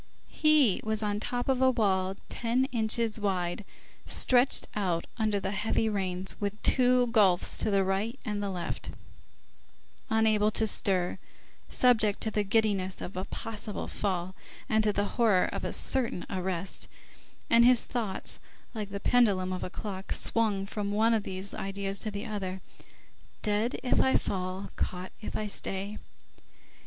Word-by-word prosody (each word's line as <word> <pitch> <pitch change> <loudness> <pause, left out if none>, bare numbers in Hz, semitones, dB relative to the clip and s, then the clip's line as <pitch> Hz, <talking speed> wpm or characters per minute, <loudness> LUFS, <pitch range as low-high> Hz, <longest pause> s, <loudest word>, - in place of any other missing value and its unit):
He 305 - +4
was 220 0 +1
on 205 0 -1
top 245 +2 -3
of 265 -1 +1
a 260 - +6
wall 190 -5 +1
ten 240 +3 0
inches 225 -1 0
wide, 185 -2 -1 0.4
stretched 255 +1 +4
out 180 -5 -1
under 215 -2 +1
the 190 0 -3
heavy 210 +2 0
rains, 190 -2 -2
with 205 +1 -2
two 250 -1 +4
gulfs 195 -6 +4
to - - +1
right 200 +7 -1
and 210 -2 -2
left, 185 -4 -4 1.2
unable 220 -1 +3
to 220 +1 +1
stir, 185 -4 0 0.5
subject 220 -5 +3
to 220 - +2
the 210 -1 +1
giddiness 200 -3 +1
of 180 - -7
a 185 +1 -3
possible 215 -2 -5
fall, 185 -2 -2 0.3
and 220 0 +2
to 210 - +4
the 205 0 0
horror 210 -4 +3
of - - -4
a - - -2
certain 245 -9 -1
arrest, 185 -1 -2 0.6
and 235 0 +6
his 245 -1 +6
thoughts, 225 -6 -1 0.3
like 210 -3 -4
the 200 0 -5
pendulum 195 -6 +2
of 185 - -4
a - - -4
clock, 195 -1 -6
swung 210 -4 +1
from 205 0 -3
one 220 +3 +3
of 220 - +2
these 190 0 -3
ideas 195 0 -3
to 215 - -3
the 205 +2 -5
other: 190 -4 -4 0.8
"Dead 215 +4 0
if 250 - +2
I 265 - +3
fall, 185 0 -2
caught 180 +1 -3
if - - -5
I 215 - -2
stay." 200 0 -2
205 Hz, 150 wpm, -29 LUFS, 190-225 Hz, 1.2 s, a